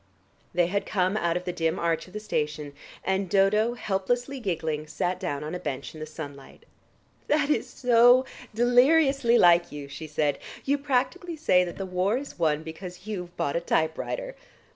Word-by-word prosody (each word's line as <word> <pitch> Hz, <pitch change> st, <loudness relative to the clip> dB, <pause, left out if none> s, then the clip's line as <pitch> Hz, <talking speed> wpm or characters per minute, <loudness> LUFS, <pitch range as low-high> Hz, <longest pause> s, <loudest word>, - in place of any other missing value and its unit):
They 175 Hz, 0 st, +2 dB
had 200 Hz, +4 st, -2 dB
come 185 Hz, 0 st, +1 dB
out 170 Hz, -5 st, +1 dB
of 180 Hz, -, -5 dB
the 180 Hz, -, -2 dB
dim 165 Hz, -2 st, 0 dB
arch 165 Hz, 0 st, -1 dB
of 185 Hz, -, -16 dB
the 210 Hz, -, -4 dB
station, 150 Hz, -8 st, -3 dB, 0.3 s
and 190 Hz, 0 st, 0 dB
Dodo, 210 Hz, +5 st, +3 dB
helplessly 245 Hz, +6 st, -2 dB
giggling, 160 Hz, -7 st, -2 dB
sat 180 Hz, +4 st, -2 dB
down 150 Hz, -7 st, -3 dB
on 155 Hz, -, -5 dB
a 180 Hz, -, -3 dB
bench 140 Hz, -4 st, -5 dB
in 155 Hz, -, -10 dB
the 155 Hz, -, -6 dB
sunlight. 145 Hz, -3 st, -10 dB, 0.6 s
"That's 295 Hz, 0 st, +1 dB
so 245 Hz, +1 st, +5 dB, 0.3 s
deliriously 245 Hz, +2 st, +4 dB
like 175 Hz, -2 st, +5 dB
you," 145 Hz, -1 st, -7 dB
she 150 Hz, +3 st, -8 dB
said. 150 Hz, -2 st, 0 dB, 0.3 s
"You 285 Hz, +1 st, +1 dB
practically 290 Hz, +6 st, -1 dB
say 185 Hz, -13 st, +3 dB
that 175 Hz, -, -7 dB
the 195 Hz, -, -4 dB
war 185 Hz, +4 st, 0 dB
is 275 Hz, -8 st, -8 dB
won 155 Hz, -2 st, +1 dB
because 180 Hz, +3 st, -9 dB
you've 180 Hz, -5 st, -6 dB
bought 140 Hz, -, -1 dB
a 170 Hz, -, +1 dB
typewriter. 170 Hz, -, -1 dB
185 Hz, 175 wpm, -26 LUFS, 160-245 Hz, 0.6 s, so